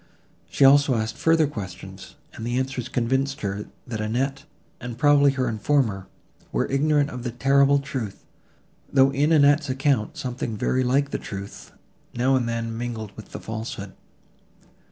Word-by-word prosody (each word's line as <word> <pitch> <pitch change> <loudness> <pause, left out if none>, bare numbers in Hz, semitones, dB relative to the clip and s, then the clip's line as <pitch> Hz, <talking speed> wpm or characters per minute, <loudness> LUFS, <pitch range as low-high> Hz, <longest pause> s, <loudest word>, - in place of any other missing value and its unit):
She 140 - +3
also 140 -1 +6
asked 110 0 -2
further 165 -1 +3
questions, 105 -11 -8 0.2
and - - -8
the 120 +2 -1
answers 130 -2 -3
convinced 135 +4 -1
her, 100 0 -3 0.2
that 110 -4 -4
Annette, 135 +6 -2 0.3
and 120 -2 -7
probably 145 +1 +5
her 130 -2 -1
informer, 110 -3 0 0.4
were - - 0
ignorant 145 +1 +2
of 125 - -6
the 120 - -3
terrible 140 +3 +3
truth, 130 -8 -5 0.7
though 135 0 +5
in 145 +3 +1
Annette's 145 -1 +4
account 135 -4 0
something 120 -3 -4
very 130 +5 +1
like 140 +3 +1
the - - -2
truth, 100 0 -8 0.4
now 130 +3 +2
and 120 -2 0
then, 115 -1 -3
mingled 115 -3 -5
with 110 - -11
the - - -6
falsehood. 110 -3 -6
130 Hz, 155 wpm, -24 LUFS, 115-140 Hz, 0.7 s, also